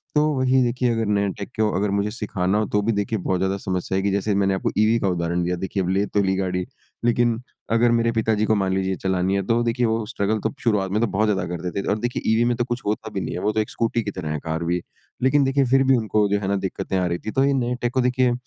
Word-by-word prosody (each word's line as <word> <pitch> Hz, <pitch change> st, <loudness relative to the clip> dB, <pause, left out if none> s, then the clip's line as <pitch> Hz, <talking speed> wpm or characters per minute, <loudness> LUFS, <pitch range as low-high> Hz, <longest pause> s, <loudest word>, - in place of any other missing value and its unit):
तो 150 Hz, -, +5 dB, 0.2 s
वही 130 Hz, 0 st, +3 dB
देखिए 125 Hz, +1 st, 0 dB
अगर 115 Hz, -1 st, 0 dB
नया 100 Hz, -1 st, +1 dB
टेक 100 Hz, -, -6 dB
को 110 Hz, -, +3 dB
अगर 100 Hz, +2 st, +1 dB
मुझे 100 Hz, +1 st, 0 dB
सिखाना 100 Hz, -3 st, -1 dB
हो 110 Hz, -, +1 dB
तो 105 Hz, -, +3 dB
भी -, -, +4 dB
देखिए 105 Hz, +2 st, -1 dB
बहुत 90 Hz, 0 st, -1 dB
ज़्यादा 95 Hz, +1 st, 0 dB
समस्या 95 Hz, 0 st, -3 dB
आएगी। 95 Hz, +1 st, +1 dB
जैसे 100 Hz, +1 st, 0 dB
मैंने 100 Hz, -1 st, +2 dB
आपको 95 Hz, -, -1 dB
ईवी 110 Hz, +2 st, +4 dB
का 100 Hz, -, 0 dB
उदाहरण 85 Hz, 0 st, -1 dB
दिया। 90 Hz, +1 st, 0 dB
देखिए 95 Hz, +1 st, -2 dB
अब 90 Hz, -, -2 dB
ले 100 Hz, +2 st, +2 dB
तो 105 Hz, -, 0 dB
ली 95 Hz, 0 st, +1 dB
गाड़ी। 90 Hz, -1 st, -1 dB, 0.4 s
लेकिन 120 Hz, -1 st, +2 dB, 0.3 s
अगर 115 Hz, +1 st, +4 dB
मेरे 115 Hz, 0 st, +2 dB
पिताजी 110 Hz, -1 st, +1 dB
को 110 Hz, -, +2 dB
मान 95 Hz, -2 st, 0 dB
लीजिए 95 Hz, 0 st, 0 dB
चलानी 95 Hz, 0 st, +1 dB
है 100 Hz, -, +1 dB
तो 115 Hz, 0 st, +2 dB
देखिए 120 Hz, +1 st, +1 dB
वो 110 Hz, -1 st, 0 dB
स्ट्रगल 105 Hz, -2 st, -1 dB
तो -, -, -2 dB
शुरुआत 105 Hz, -5 st, +1 dB
में 105 Hz, -, +1 dB
तो 115 Hz, -, +2 dB
बहुत 105 Hz, +2 st, +1 dB
ज़्यादा 95 Hz, -3 st, 0 dB
करते 90 Hz, +1 st, -4 dB
थे। -, -, -8 dB
और 105 Hz, -, +1 dB
देखिए 120 Hz, +2 st, -2 dB
ईवी 115 Hz, +1 st, +3 dB
में 120 Hz, 0 st, +1 dB
तो 120 Hz, -, +1 dB
कुछ 120 Hz, -1 st, -3 dB
होता 105 Hz, +1 st, -2 dB
भी 95 Hz, -, -2 dB
नहीं -, -, -4 dB
है। 90 Hz, -, -4 dB
वो 105 Hz, -, +1 dB
तो 110 Hz, -, -1 dB
एक 105 Hz, -, -1 dB
स्कूटी 115 Hz, 0 st, -1 dB
की 100 Hz, -, -3 dB
तरह 75 Hz, -3 st, -5 dB
है 75 Hz, -, -2 dB
कार 80 Hz, +2 st, -3 dB
भी। 85 Hz, +1 st, 0 dB, 0.4 s
लेकिन 140 Hz, +2 st, +4 dB
देखिए 135 Hz, 0 st, +2 dB
फिर 135 Hz, 0 st, +5 dB
भी 135 Hz, 0 st, +4 dB
उनको 110 Hz, -2 st, +1 dB
जो 100 Hz, 0 st, +1 dB
है 95 Hz, -, -4 dB
ना 100 Hz, -, +1 dB
दिक्कतें 95 Hz, +1 st, -3 dB
आ 90 Hz, -, +1 dB
रही 85 Hz, 0 st, -1 dB
थी। 110 Hz, -, -2 dB
तो 135 Hz, -, +2 dB
ये 140 Hz, -, +2 dB
नए 125 Hz, -2 st, 0 dB
टेक 120 Hz, 0 st, -1 dB
को 130 Hz, -, +2 dB
देखिए 125 Hz, 0 st, +2 dB
105 Hz, 290 wpm, -23 LUFS, 95-115 Hz, 0.4 s, तो